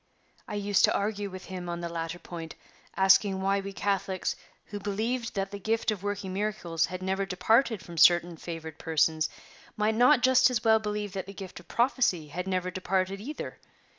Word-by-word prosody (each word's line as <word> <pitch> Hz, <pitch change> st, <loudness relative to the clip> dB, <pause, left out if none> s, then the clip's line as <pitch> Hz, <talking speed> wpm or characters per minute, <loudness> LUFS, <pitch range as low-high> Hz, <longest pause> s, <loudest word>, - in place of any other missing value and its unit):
I -, -, -5 dB
used 205 Hz, -1 st, +2 dB
to -, -, +1 dB
argue 205 Hz, 0 st, -1 dB
with 185 Hz, 0 st, -9 dB
him 180 Hz, -2 st, -6 dB
on 170 Hz, 0 st, -4 dB
the 170 Hz, -, -3 dB
latter 165 Hz, 0 st, -4 dB
point, 165 Hz, -2 st, -8 dB, 0.4 s
asking 190 Hz, 0 st, +5 dB
why 195 Hz, +1 st, +1 dB
we 195 Hz, 0 st, -5 dB
Catholics, 195 Hz, -1 st, -1 dB, 0.3 s
who 205 Hz, -, -6 dB
believed 225 Hz, +4 st, -2 dB
that 195 Hz, 0 st, -2 dB
the 200 Hz, -, -6 dB
gift 225 Hz, +2 st, 0 dB
of 205 Hz, -4 st, -4 dB
working 205 Hz, -2 st, -3 dB
miracles 190 Hz, -5 st, -1 dB
had 185 Hz, 0 st, -6 dB
never 190 Hz, +1 st, 0 dB
departed 215 Hz, +3 st, +2 dB
from 170 Hz, -2 st, -7 dB
certain 175 Hz, 0 st, +6 dB
favored 160 Hz, -1 st, -7 dB
persons, 160 Hz, 0 st, +1 dB, 0.5 s
might 210 Hz, +1 st, +2 dB
not 245 Hz, +4 st, +5 dB
just 260 Hz, 0 st, +6 dB
as 250 Hz, -2 st, -1 dB
well 220 Hz, -1 st, +5 dB
believe 210 Hz, -2 st, -3 dB
that 190 Hz, -1 st, -4 dB
the 195 Hz, -, -9 dB
gift 190 Hz, -2 st, -8 dB
of 175 Hz, -, -17 dB
prophecy 235 Hz, -, +1 dB
had 180 Hz, +5 st, -4 dB
never 185 Hz, -1 st, -1 dB
departed, 190 Hz, +1 st, -1 dB
either? 285 Hz, +7 st, -6 dB
195 Hz, 190 wpm, -28 LUFS, 180-210 Hz, 0.5 s, certain